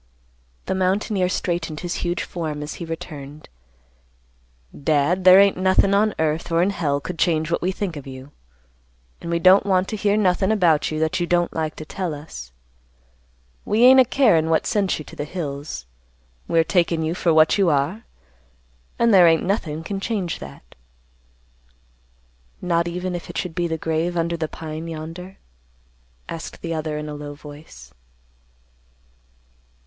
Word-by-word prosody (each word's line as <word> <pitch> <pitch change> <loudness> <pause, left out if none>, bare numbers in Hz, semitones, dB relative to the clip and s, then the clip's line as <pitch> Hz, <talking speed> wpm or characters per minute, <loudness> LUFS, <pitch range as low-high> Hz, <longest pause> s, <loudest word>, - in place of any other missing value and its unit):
The - - -1
mountaineer 190 0 0
straightened 170 -4 -3
his 175 -1 -3
huge 175 +1 -2
form 155 -4 -5
as 150 - -6
he - - -3
returned, 150 -3 -8 1.3
"Dad, 155 +5 +1
there 185 +1 +9
ain't 200 -1 +4
nothin' 190 +1 +3
on 210 +1 +2
earth 160 +1 -1
or 165 +1 +3
in 195 - +1
hell 150 -7 -1
could 165 +4 -7
change 160 -1 +1
what - - 0
we 185 - 0
think 190 -3 -4
of 140 -2 -8
you, 130 +1 -10 0.9
and 170 - -6
we 170 - +1
don't 185 +3 +6
want 190 -1 +1
to - - -3
hear 205 0 +1
nothin' 190 0 +2
about 175 -8 +3
you 155 - -3
that 160 +3 0
you 175 - -1
don't 175 0 +1
like 160 -1 -3
to 155 - -8
tell 175 -1 -4
us. 65 - -10 1.1
We 220 +3 +1
ain't 260 +1 +8
a - - +8
carin' 220 - +3
what 160 - +2
sent 205 -5 0
you 155 - -8
to - - -12
the - - -4
hills. 145 - -6 0.6
We're 165 0 +3
takin' 170 -2 +1
you 160 +1 -1
for 175 -1 +1
what 160 +4 +4
you 190 -3 +4
are. 150 +9 0 0.9
And 235 -1 +3
there 180 -3 +8
ain't 165 -1 +3
nothin' 165 -5 -2
can 195 +3 -4
change 195 -5 -3
that." 70 -3 -12 1.9
"Not 170 -1 0
even 180 +1 -3
if 175 - -6
it - - -6
should 180 - -3
be 175 +1 -1
the 160 -1 -2
grave 165 +2 -1
under 170 0 0
the 160 -1 -3
pine 160 +1 -7
yonder?" 165 +4 -8 0.9
asked 165 -1 -8
the 165 -1 -3
other 155 -1 -3
in 150 0 -5
a 150 - -6
low 145 0 -7
voice. 150 +1 -13
170 Hz, 170 wpm, -22 LUFS, 155-185 Hz, 1.9 s, there